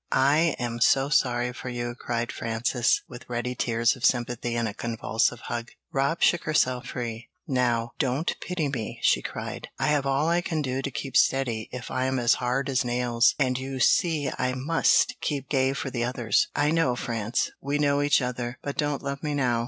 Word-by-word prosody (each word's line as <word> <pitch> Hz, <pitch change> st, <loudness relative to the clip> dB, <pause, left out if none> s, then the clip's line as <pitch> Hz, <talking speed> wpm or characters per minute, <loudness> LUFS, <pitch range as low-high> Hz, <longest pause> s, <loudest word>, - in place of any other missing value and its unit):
I 150 Hz, +4 st, +3 dB
am 120 Hz, -1 st, -3 dB
so 135 Hz, +3 st, +4 dB
sorry 125 Hz, -3 st, +1 dB
for 125 Hz, -, -7 dB
you!" 120 Hz, -1 st, -3 dB
cried 120 Hz, -1 st, -3 dB
Frances, 115 Hz, +2 st, 0 dB
with 120 Hz, -, -11 dB
ready 120 Hz, +1 st, -2 dB
tears 115 Hz, 0 st, +1 dB
of 130 Hz, -, -13 dB
sympathy 120 Hz, -1 st, +1 dB
and 115 Hz, -1 st, 0 dB
a 105 Hz, -, -4 dB
convulsive 115 Hz, +1 st, -1 dB
hug. 120 Hz, 0 st, -4 dB, 0.2 s
Rob 140 Hz, +5 st, 0 dB
shook 175 Hz, -, +3 dB
herself 130 Hz, -5 st, +1 dB
free. 115 Hz, -2 st, -5 dB, 0.2 s
"Now, 120 Hz, -3 st, +1 dB
don't 140 Hz, +3 st, 0 dB
pity 180 Hz, -4 st, -2 dB
me!" 125 Hz, -6 st, -4 dB
she -, -, +4 dB
cried. -, -, -6 dB
"I -, -, 0 dB
have 145 Hz, -2 st, +1 dB
all 135 Hz, +3 st, +1 dB
I 170 Hz, +1 st, +2 dB
can 160 Hz, -4 st, -2 dB
do 130 Hz, 0 st, -2 dB
to 140 Hz, -, -3 dB
keep 135 Hz, 0 st, -6 dB
steady 120 Hz, -6 st, +2 dB
if 125 Hz, 0 st, -7 dB
I 130 Hz, 0 st, 0 dB
am 130 Hz, 0 st, 0 dB
as 120 Hz, -1 st, +4 dB
hard 125 Hz, +3 st, 0 dB
as 135 Hz, -1 st, +1 dB
nails, 120 Hz, -1 st, +2 dB
and 130 Hz, -3 st, +1 dB
you 135 Hz, 0 st, -5 dB
see 150 Hz, 0 st, +2 dB
I 125 Hz, 0 st, 0 dB
must 150 Hz, +6 st, +2 dB
keep 140 Hz, -3 st, -2 dB
gay 135 Hz, -2 st, +2 dB
for 135 Hz, -1 st, -4 dB
the 120 Hz, -2 st, -1 dB
others. 120 Hz, -3 st, +1 dB
I 145 Hz, +1 st, +2 dB
know, 160 Hz, -7 st, +2 dB
France; 115 Hz, -2 st, -2 dB
we 140 Hz, +1 st, -1 dB
know 145 Hz, -1 st, +2 dB
each 145 Hz, -2 st, +3 dB
other, 125 Hz, 0 st, -3 dB
but 140 Hz, -, -4 dB
don't 145 Hz, -1 st, -1 dB
love 140 Hz, 0 st, -4 dB
me 150 Hz, -2 st, -2 dB
now! 125 Hz, -4 st, +1 dB
130 Hz, 200 wpm, -26 LUFS, 120-140 Hz, 0.2 s, so